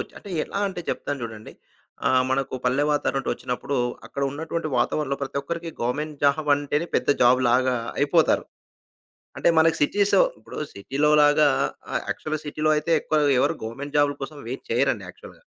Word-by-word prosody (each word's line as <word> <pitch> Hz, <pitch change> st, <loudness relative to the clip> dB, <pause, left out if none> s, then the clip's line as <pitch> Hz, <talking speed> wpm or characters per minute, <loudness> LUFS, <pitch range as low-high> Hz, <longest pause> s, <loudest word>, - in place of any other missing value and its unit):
వచ్చి -, -, -7 dB
అంటే, 200 Hz, -, -11 dB
ఎలా -, -, -5 dB
అంటే 185 Hz, -, -6 dB
చెప్తాను 140 Hz, -2 st, -4 dB
జూడండి. 110 Hz, -2 st, -7 dB, 0.6 s
ఆహ్, 130 Hz, 0 st, +4 dB
మనకు 135 Hz, 0 st, -1 dB
పల్లె 130 Hz, +4 st, +2 dB
వాతావరణం 135 Hz, -2 st, 0 dB
నుండొచ్చినప్పుడు, 130 Hz, +3 st, -3 dB, 0.3 s
అక్కడ 140 Hz, -, -5 dB
ఉన్నటువంటి 160 Hz, +2 st, -3 dB
వాతావరణంలో 140 Hz, +3 st, 0 dB
ప్రతి 140 Hz, 0 st, -3 dB
ఒక్కరికి 170 Hz, +2 st, -5 dB
గవర్నమెంట్ 145 Hz, +5 st, -2 dB
జాబంటేనే 145 Hz, +1 st, +2 dB
పెద్ద -, -, 0 dB
జాబ్ 125 Hz, +1 st, +5 dB
లాగా 130 Hz, +1 st, +3 dB, 0.2 s
అయిపోతారు. 155 Hz, +3 st, +3 dB, 0.9 s
అంటే -, -, +2 dB
మనకి 160 Hz, 0 st, +4 dB
సిటీసొ 205 Hz, -, +3 dB, 0.2 s
ఇప్పుడు -, -, -12 dB, 0.2 s
సిటీ‌లో 135 Hz, +9 st, 0 dB
లాగా 145 Hz, 0 st, +5 dB, 0.5 s
ఆహ్, -, -, 0 dB
యాక్చువల్‌గా 155 Hz, 0 st, -3 dB
సిటీ‌లో 155 Hz, +1 st, 0 dB
అయితే 165 Hz, +2 st, -1 dB
ఎక్కువ 155 Hz, -1 st, +1 dB, 0.2 s
ఎవరు -, -, +1 dB
గవర్నమెంట్ 140 Hz, +6 st, -5 dB
జాబ్‌ల 145 Hz, 0 st, +2 dB
కోసం 145 Hz, +2 st, -6 dB
వెయిట్ 130 Hz, -, -6 dB
చేయరండి -, -, +1 dB
యాక్చువల్‌గా. -, -, -14 dB
145 Hz, 155 wpm, -24 LUFS, 135-155 Hz, 0.9 s, జాబ్